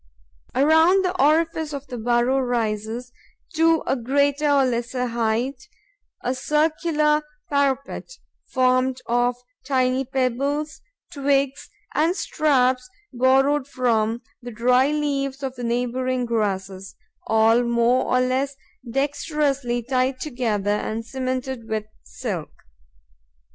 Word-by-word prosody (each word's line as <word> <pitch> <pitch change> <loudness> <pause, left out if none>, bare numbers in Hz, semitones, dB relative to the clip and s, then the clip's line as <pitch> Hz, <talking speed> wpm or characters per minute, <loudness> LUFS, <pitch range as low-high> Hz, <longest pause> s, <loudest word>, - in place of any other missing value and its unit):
Around 320 +7 +5
the 365 0 -1
orifice 315 +1 +2
of 280 -1 -5
the 250 -3 -7
burrow 240 +3 +2
rises, 235 -1 -2 0.4
to 325 0 +3
a - - +1
greater 280 +4 +1
or 280 -2 +4
lesser 250 +1 -1
height, 240 - -2 0.5
a 250 - 0
circular 300 +2 +1 0.3
parapet, 275 - 0 0.4
formed 255 0 +2
of 245 +1 +1 0.3
tiny 260 -1 +1
pebbles, 275 +3 -1 0.3
twigs 280 -1 0 0.2
and 320 +5 +2
straps 255 -7 +1 0.2
borrowed 265 +3 +3
from 235 -3 0 0.2
the 245 - -7
dry 250 +3 +3
leaves 285 -2 -2
of 265 -1 -3
the 245 -1 -8
neighbouring 250 +1 -1
grasses, 195 -4 -2 0.3
all 225 +2 +4
more 235 +1 +2
or 255 - +2
less 265 +2 0 0.3
dexterously 275 -2 -1
tied 255 +1 0
together 230 -8 -1
and 220 +2 -2
cemented 255 -1 -4
with 215 -1 -2 0.2
silk. 190 -11 -5
255 Hz, 110 wpm, -23 LUFS, 240-280 Hz, 0.5 s, Around